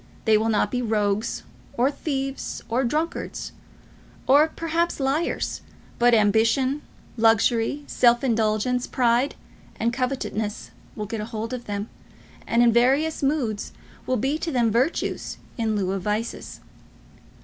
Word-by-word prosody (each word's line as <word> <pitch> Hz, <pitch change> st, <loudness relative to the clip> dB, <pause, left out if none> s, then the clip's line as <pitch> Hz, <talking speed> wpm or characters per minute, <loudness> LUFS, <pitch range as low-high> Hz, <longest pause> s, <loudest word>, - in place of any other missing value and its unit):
They 220 Hz, -, +5 dB
will 220 Hz, +1 st, +2 dB
not 215 Hz, -, +1 dB
be 250 Hz, -, -1 dB
rogues, 215 Hz, -2 st, 0 dB, 0.3 s
or 255 Hz, +4 st, +3 dB
thieves, 275 Hz, -2 st, -4 dB
or 240 Hz, +3 st, +1 dB
drunkards, 310 Hz, +7 st, -2 dB, 0.7 s
or, 290 Hz, +4 st, +6 dB
perhaps, 330 Hz, +1 st, -1 dB
liars; 280 Hz, +5 st, -1 dB, 0.4 s
but 240 Hz, 0 st, +5 dB
ambition, 230 Hz, +7 st, +2 dB, 0.4 s
luxury, 225 Hz, +4 st, +3 dB
self 240 Hz, -2 st, +3 dB
indulgence, 230 Hz, +1 st, +1 dB
pride, 245 Hz, +2 st, +2 dB, 0.4 s
and 235 Hz, +2 st, +1 dB
covetousness 245 Hz, -4 st, -3 dB, 0.2 s
will 210 Hz, -, -4 dB
get 220 Hz, +1 st, -4 dB
a -, -, -4 dB
hold 225 Hz, +1 st, -5 dB
of 245 Hz, -1 st, -5 dB
them, 205 Hz, +1 st, -3 dB, 0.6 s
and 235 Hz, +1 st, +3 dB
in 235 Hz, -1 st, +5 dB
various 270 Hz, +7 st, +3 dB
moods 270 Hz, -7 st, -1 dB, 0.3 s
will 255 Hz, -, +1 dB
be 270 Hz, +7 st, 0 dB
to 330 Hz, -, -3 dB
them 240 Hz, -4 st, +2 dB
virtues 255 Hz, +9 st, -1 dB, 0.2 s
in 225 Hz, -3 st, 0 dB
lieu 190 Hz, -2 st, 0 dB
of 195 Hz, -1 st, -2 dB
vices. 210 Hz, +4 st, -3 dB
240 Hz, 135 wpm, -24 LUFS, 220-270 Hz, 0.7 s, or